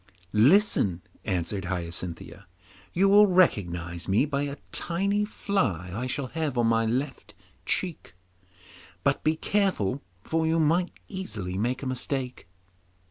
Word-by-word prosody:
'Listen,' 110 - +4 0.2
answered 95 +2 -1
Hyacinthia. 90 +1 -5 0.4
'You 190 +3 +3
will 205 +1 +7
recognise 85 - +1
me 100 +8 +3
by 140 -2 -1
a 140 0 -5
tiny 200 +4 0
fly 115 - -1
I 120 +5 -3
shall 135 +2 -2
have 155 -4 -2
on 120 - +3
my 115 0 +2
left 130 +4 -3 0.3
cheek, 170 - -2 0.9
but 140 0 +1
be 155 +1 +2
careful 160 - 0 0.2
for 160 0 0
you 165 +1 +2
might 170 +4 +2 0.2
easily 110 - -3
make 125 +6 -1
a - - -3
mistake. 130 -2 -3
130 Hz, 130 wpm, -27 LUFS, -, 0.9 s, will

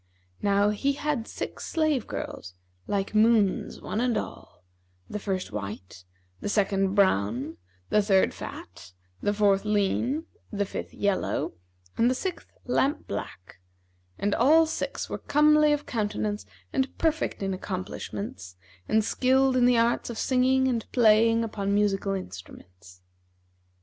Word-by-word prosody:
Now 200 0 +3
he 275 +7 0
had 285 -5 -2
six - - -6
slave 310 -7 0
girls, 90 0 -6 0.3
like 200 0 -1
moons 215 -3 +3
one 220 - -2
and 245 -2 +1
all; 90 - -7 0.4
the 210 - -5
first 190 -2 -3
white, 100 -3 -7 0.3
the - - -4
second 195 -2 +1
brown, 135 - +1 0.3
the 210 - +5
third 195 -2 +3
fat, 85 +1 -9 0.3
the 205 - +1
fourth 205 -1 +3
lean, 215 +9 0 0.3
the 205 -2 -1
fifth - - -6
yellow 200 -2 -1 0.5
and 235 - +5
the 255 - +1
sixth 370 +5 -5
lamp 265 +3 +1
black; 95 -2 -7 0.6
and 205 0 0
all 315 +7 +5
six 320 - -3
were - - -5
comely 300 +1 +4
of 295 0 0
countenance 210 -2 -2 0.3
and 265 0 -1
perfect 315 -9 0
in 195 0 -1
accomplishments 185 - -6 0.3
and 220 0 +3
skilled 265 +2 +3
in 250 -1 +4
the 245 -1 +4
arts 235 +1 +1
of 235 - -6
singing 260 +1 +2
and 235 -3 -2
playing 230 -1 +4
upon 200 -3 -1
musical 200 -1 +1
instruments. 90 - -10
210 Hz, 135 wpm, -27 LUFS, 195-250 Hz, 0.6 s, the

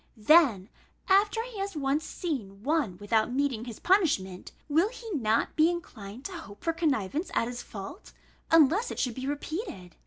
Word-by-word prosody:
Then 225 - +5 0.4
after 410 +3 +3
he 470 -4 -8
has 395 -2 -3
once 285 +1 0
seen 215 - -5
one 280 - 0
without 215 +3 +1
meeting 260 -3 -1
his 235 -3 -7
punishment, 285 - +1 0.2
will 325 +7 +3
he 465 -2 -9
not 230 - 0
be 315 +2 +5
inclined 245 - -7
to - - -4
hope 325 - -10
for 330 - +1
connivance 300 - -1
at 230 - +2
his 245 0 -5
fault, 210 - -9 0.4
unless 330 - +5
it - - -6
should 250 -3 0
be 260 +3 -5
repeated? 285 - -5
285 Hz, 165 wpm, -28 LUFS, 220-345 Hz, 0.4 s, Then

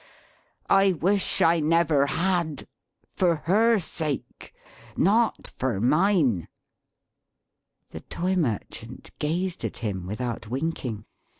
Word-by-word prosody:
I 195 -1 +4
wish 190 +4 +1
I 165 +1 +4
never 155 -2 +3
had! 170 -3 -1 0.5
For 175 -3 +2
her 225 +6 +4
sake; 160 -5 -4 0.5
not 220 +5 +2
for 125 -6 -1
mine!" 145 - +2 1.4
The - - -7
Toy 185 +2 -2
Merchant 125 - -4
gazed 175 +4 -2
at - - -4
him, 95 -6 -4
without 115 +2 -4
winking. 125 -4 -3
165 Hz, 100 wpm, -25 LUFS, 125-185 Hz, 1.4 s, I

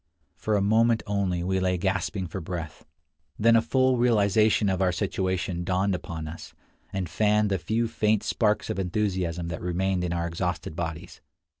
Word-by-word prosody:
For 110 +4 -1
a 100 - +2
moment 115 +2 +3
only 95 -4 -1
we 95 +1 0
lay 90 -1 +1
gasping 95 +1 -1
for 90 +3 -6
breath; 85 -2 -6 0.5
then 115 +2 +5
a 115 - +5
full 130 +2 +2
realization 110 -2 +3
of 95 -1 0
our 95 -1 +3
situation 95 -2 -2
dawned 95 +2 +1
upon 80 -3 -5
us, 80 +2 -9 0.4
and 95 -2 -2
fanned 105 +3 +2
the 95 - +1
few 110 +7 0
faint 110 -2 +1
sparks 110 -1 +1
of - - -3
enthusiasm 90 -3 -1
that 85 - -5
remained 90 +1 0
in 90 - -2
our 85 -1 -1
exhausted 85 -2 -3
bodies. 85 +1 -5
95 Hz, 170 wpm, -26 LUFS, 85-105 Hz, 0.5 s, then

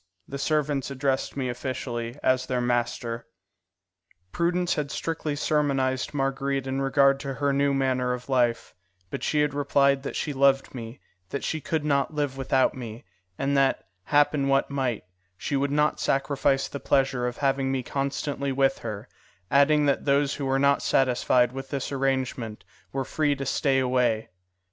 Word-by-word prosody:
The 140 - -6
servants 145 -2 0
addressed 135 0 -1
me 130 -2 -1
officially 120 -1 -4
as 130 0 +2
their 125 -1 0
master. 120 -1 -1 1.0
Prudence 175 +1 +1
had 145 -2 -2
strictly 155 -1 -3
sermonized 135 -3 0
Marguerite 135 -1 -1
in 135 +1 -2
regard 135 0 +3
to 140 -2 -5
her 140 0 0
new 140 +1 +2
manner 130 -2 +1
of 125 0 -4
life; 125 -3 +1 0.4
but - - -4
she 150 - +1
had 150 -1 +1
replied 140 -1 +2
that 140 - -5
she 150 - -2
loved 135 0 +3
me, 115 0 -8 0.3
that 140 - -4
she 160 - -2
could 155 +1 -2
not 140 +1 +1
live 145 -3 -1
without 135 -1 +2
me, 115 -4 -8 0.3
and 140 +1 0
that, 135 -1 +2 0.2
happen 145 -1 +3
what 135 +1 +2
might, 130 -5 -1 0.3
she 140 - -3
would 140 +1 +1
not 150 +1 +2
sacrifice 135 0 +1
the 140 - -6
pleasure 135 -3 +1
of 120 - -5
having 135 -1 +1
me 130 -1 -1
constantly 140 +1 -2
with 135 0 +2
her, 105 -3 -6 0.4
adding 145 +2 +4
that 140 -1 +1
those 140 0 +2
who 140 - -3
were 135 0 +2
not 140 +1 +3
satisfied 125 -1 +2
with 135 +1 -7
this 140 -1 -3
arrangement 130 -5 -2 0.3
were 135 -1 -2
free 150 0 +1
to 135 0 -5
stay 135 0 +1
away. 125 -4 +1
135 Hz, 165 wpm, -26 LUFS, 130-140 Hz, 1.0 s, adding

